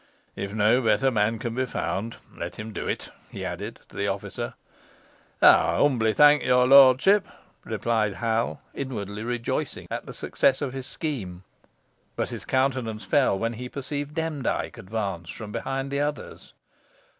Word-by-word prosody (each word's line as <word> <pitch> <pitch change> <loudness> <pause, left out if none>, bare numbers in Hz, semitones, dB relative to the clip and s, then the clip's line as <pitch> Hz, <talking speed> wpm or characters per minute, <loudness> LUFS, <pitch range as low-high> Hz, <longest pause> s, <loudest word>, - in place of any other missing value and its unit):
If 100 - -4
no 110 +4 +4
better 115 +3 +3
man 110 0 +1
can 115 +1 -4
be 130 +2 -1
found, 115 -1 -3 0.2
let 85 +1 -6
him 110 +1 -7
do - - -4
it," - - -3 0.2
he - - -6
added - - -6
to - - -18
the 100 - -1
officer. 100 0 -4 0.9
"Ey - - +11
humbly 120 -6 +3
thonk 150 +3 +6
your 125 0 +4
lortship," 140 +9 +7 0.4
replied 110 -4 0
Hal, 115 0 -1
inwardly 105 -6 -5
rejoicing 120 0 -3
at - - -4
the - - -7
success - - +1
of 135 -3 -3
his 135 -1 -5
scheme. 100 - -4 0.7
But - - -2
his - - -7
countenance 130 -5 0
fell 130 -1 +3
when 115 +3 -1
he 125 +2 -7
perceived 145 +2 -5
Demdike 160 -5 -2
advance 95 -4 -4
from 110 -2 -7
behind 135 +4 -3
the 140 - -1
others. 145 0 -4
120 Hz, 155 wpm, -26 LUFS, 105-135 Hz, 0.9 s, Ey